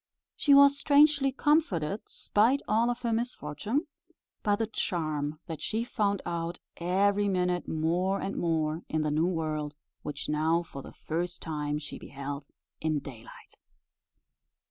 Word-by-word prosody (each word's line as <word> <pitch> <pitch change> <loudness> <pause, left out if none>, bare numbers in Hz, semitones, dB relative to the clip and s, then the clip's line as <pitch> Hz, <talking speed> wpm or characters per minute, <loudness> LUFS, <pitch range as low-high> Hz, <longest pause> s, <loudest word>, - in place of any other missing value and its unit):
She 285 -2 +5
was 280 0 +7
strangely 285 -1 +5
comforted, 225 - +1
spite 240 +7 +2
of - - -23
all 230 +3 +3
her 240 -1 -2
misfortune, 225 - -2 0.6
by 205 -1 +2
the 225 +2 0
charm 155 -8 -2
that 160 -3 -6
she 220 +1 -1
found 205 -4 0
out, 170 0 -3 0.2
every 200 +4 +2
minute 180 -2 0
more 175 +5 +1
and 195 - -3
more, 160 -1 0
in 155 -1 0
the 150 - 0
new 155 +3 +2
world 155 -4 -2 0.3
which 145 -1 -5
now 160 +3 +2
for 140 -4 -9
the - - -10
first 175 +2 -2
time 150 -2 -2
she 150 -1 -8
beheld 140 +1 -6 0.3
in 155 -1 0
daylight. 135 -5 -10
175 Hz, 145 wpm, -29 LUFS, 155-220 Hz, 0.6 s, was